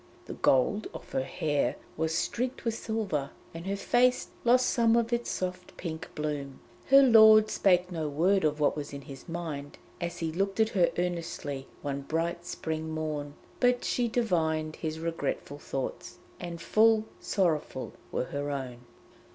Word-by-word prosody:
The - - -6
gold 135 +11 +2
of - - -10
her 130 - 0
hair 145 +2 0 0.2
was 160 +1 -1
streaked 250 +9 -2
with 230 - +1
silver, 215 -12 -2 0.2
and 165 +2 -7
her 200 - 0
face 250 +5 +2
lost 250 +1 +5
some 230 -2 +3
of 235 0 +1
its 235 0 -1
soft 180 0 -4
pink 165 -1 -5
bloom. 145 -3 -3 0.3
Her 275 +1 +8
lord 220 -3 +8
spake 180 -1 +3
no 160 -3 -2
word 185 +7 +2
of 150 0 +1
what 145 - +3
was 145 -1 -5
in 140 - -6
his 135 +3 -11
mind 155 -4 -5 0.2
as 175 0 -3
he 165 -1 -2
looked 195 +5 -1
at 220 0 +4
her 180 -6 +3
earnestly 170 -6 -3 0.2
one 140 -1 -2
bright 170 +4 -2
spring 160 -2 -3
morn, 155 -2 -3 0.2
but 245 -1 +3
she 245 -1 +1
divined 160 -9 0
his 160 -1 -4
regretful 160 -3 -3
thoughts, 135 -2 -5 0.2
and 170 -1 -6
full 220 +5 +4
sorrowful 155 -8 -1 0.2
were - - -1
her 145 +2 -4
own. 130 -4 -4
165 Hz, 160 wpm, -29 LUFS, 150-215 Hz, 0.3 s, Her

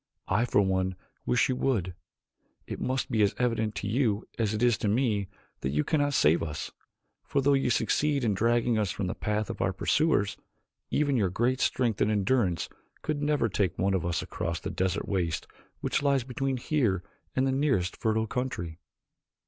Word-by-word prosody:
I 105 +6 +2
for 105 - +3
one 95 -1 0 0.3
wish 60 - +3
that - - -2
you - - -4
would. 105 -10 0 0.7
It - - -6
must 130 0 -1
be 110 -3 +2
as 100 -1 +3
evident 110 -4 0
to 100 - -3
you 110 -1 +1
as 110 -3 +1
it 105 - -1
is 120 -2 +5
to - - -1
me 105 -3 +1 0.3
that 65 - -2
you 75 +2 +1
cannot 145 -2 +1
save 75 +3 +4
us, 75 -2 -4 0.5
for 140 - 0
though 140 +1 +4
you 135 -2 +2
succeeded 140 +5 +1
in 110 -3 +2
dragging 115 +2 +2
us 105 -3 0
from 100 - -2
the 90 - -2
path 105 0 -1
of - - -6
our 95 - +2
pursuers, 105 - +1 0.5
even 145 -3 +2
your 100 -5 +2
great 120 +8 +1
strength 120 -7 +1
and - - +3
endurance 100 -3 +1 0.4
could 150 -2 -1
never 145 -5 +2
take 100 -4 0
one 95 +1 +1
of 95 -4 0
us 85 -1 -1
across 85 0 -3
the - - -5
desert 95 -1 -1
waste 85 -5 -1 0.4
which - - 0
lies 140 -3 +2
between 135 +1 -2
here 120 - 0 0.3
and 130 - +2
the 135 - +2
nearest 130 -10 +1
fertile 110 0 0
country." 105 -10 -4
110 Hz, 190 wpm, -28 LUFS, 95-130 Hz, 0.7 s, is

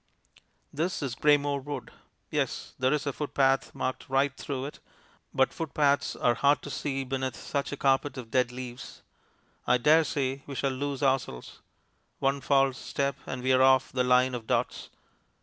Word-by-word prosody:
This 165 +1 -2
is 135 -4 -2
Greymoor 145 0 +2
Wood. 145 +1 -6 0.4
Yes; - - -2
there 130 0 +2
is 150 -1 0
a 140 - -1
footpath 135 -2 +1
marked 130 +1 -3
right 135 +1 +2
through 135 -1 -4
it, 145 - -8 0.5
but 130 - +2
footpaths 145 -3 +1
are 120 - +2
hard 140 +3 +2
to 145 - -6
see 135 -1 -2
beneath 130 -2 -3
such 140 +9 -3
a 145 - -4
carpet 135 0 +1
of 115 -3 -8
dead 125 0 +2
leaves. 125 0 -8 0.6
I 125 - +5
dare 155 +6 +5
say 135 -2 -2
we 140 - -6
shall 135 +1 0
lose 140 +1 -3
ourselves. 130 - -1 0.6
One 135 +1 0
false 135 -2 +2
step 140 0 -2
and 130 -1 -5
we 130 0 +3
are 130 - +4
off 130 0 +5
the 130 -1 +1
line 125 +1 +4
of 115 -3 -5
dots. - - -1
135 Hz, 170 wpm, -28 LUFS, 130-140 Hz, 0.6 s, I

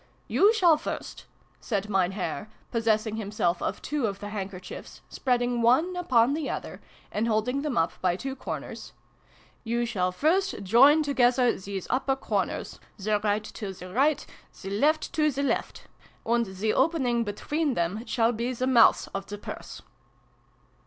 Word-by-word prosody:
f> - - -32 0.2
" - - -37
You 410 +2 +6
shall 355 -8 +5
first," 310 - -6 0.3
said 205 -3 -2
Mein 190 -2 +1
Herr, 210 +2 -4 0.2
possessing 220 -2 +1
himself 200 -5 -1
of - - -3
two 295 -6 -1
of 200 -1 -4
the 205 - -6
handkerchiefs, 195 -3 -7
spreading 245 -2 0
one 280 +11 +3
upon 260 -8 +3
the 305 -2 -2
other, - - -5 0.3
and 220 +2 0
holding 235 +5 0
them 290 -4 -2
up 165 0 +2
by 180 -2 +2
two 265 +8 -5
corners, - - -7 0.3
" - - -32 0.3
you 235 +1 0
shall 185 -6 0
first 345 - +1
join 270 +10 +6
together 250 -3 +3
these 195 -1 -6
upper 265 +1 +1
corners, 265 - -3 0.2
the 210 +1 0
right 210 0 0
to 205 -2 -6
the 180 0 -10
right, 285 +5 +2 0.4
the 195 - -5
left 300 +10 +1
to 305 -1 +3
the 280 0 -2
left; 280 - -2 0.4
and 235 0 +1
the 190 +3 -1
opening 265 -5 +2
between 285 +7 -2
them 175 +6 -1
shall 230 -1 +2
be 240 +2 -2
the 255 +1 -2
mouth 245 -3 +5
of 195 0 -4
the 205 - -6
Purse." - - -8
235 Hz, 165 wpm, -27 LUFS, 205-275 Hz, 0.4 s, You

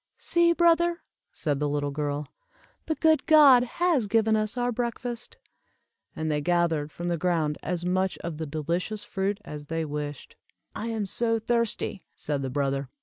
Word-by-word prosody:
"See, 340 0 +3
brother," 340 0 +3 0.3
said 145 -4 -2
the 145 0 0
little 145 0 -1
girl, 145 0 -3 0.6
"the 315 - 0
good 315 -1 +3
God 285 -6 +8
has 290 -2 +1
given 220 +1 +3
us 215 +2 -1
our 245 0 +1
breakfast;" 240 - -4 0.8
and 155 0 -2
they 150 0 0
gathered 165 -2 +1
from 175 - -5
the 170 -2 -1
ground 160 -4 0
as 175 +1 -3
much 185 +1 0
of 165 -2 -5
the 160 - -3
delicious 170 +8 -2
fruit 195 0 -2
as 145 -1 -8
they 165 +1 -2
wished. 145 -1 -6 0.4
"I 220 - -4
am 220 -3 -2
so 230 +3 +1
thirsty," 230 -3 -1
said 145 -2 -2
the 135 - -3
brother. 135 0 -1
180 Hz, 165 wpm, -27 LUFS, 150-235 Hz, 0.8 s, God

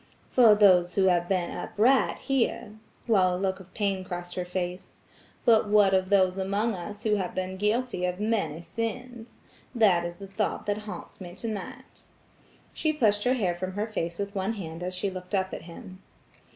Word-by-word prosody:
"For 230 -4 +6
those 180 -4 +5
who 195 - +3
have 175 -2 +2
been 185 -3 0
upright 250 +6 +2
here," 245 -4 -1 0.3
while 185 -6 +3
a - - -2
look 190 0 -1
of 185 -1 -14
pain 200 -3 -1
crossed 175 -1 -6
her 180 - -3
face. 180 0 -5 0.5
"But 220 -3 +4
what 205 -2 +5
of 185 0 +2
those 190 -2 +3
among 200 +4 0
us 205 +3 -7
who 210 -1 +2
have 185 -3 -3
been 185 0 -3
guilty 210 0 0
of 180 +1 -2
many 200 -8 -1
sins? 235 +2 -5 0.4
That 195 -7 +4
is 175 0 -5
the 200 - -9
thought 195 +2 -2
that 205 0 0
haunts 205 - -8
me 175 -1 -8
tonight." 215 0 -7 0.7
She 310 - 0
pushed 215 -8 +1
her 250 +1 +3
hair 190 -8 0
from 185 +2 -5
her 205 +2 -1
face 170 -6 -4
with 200 0 -4
one 195 +3 -1
hand 165 -5 -7
as 180 +1 -3
she 195 +2 -2
looked 185 +2 -5
up 190 -1 -1
at - - -6
him. 185 +2 -11
195 Hz, 190 wpm, -27 LUFS, 180-215 Hz, 0.7 s, For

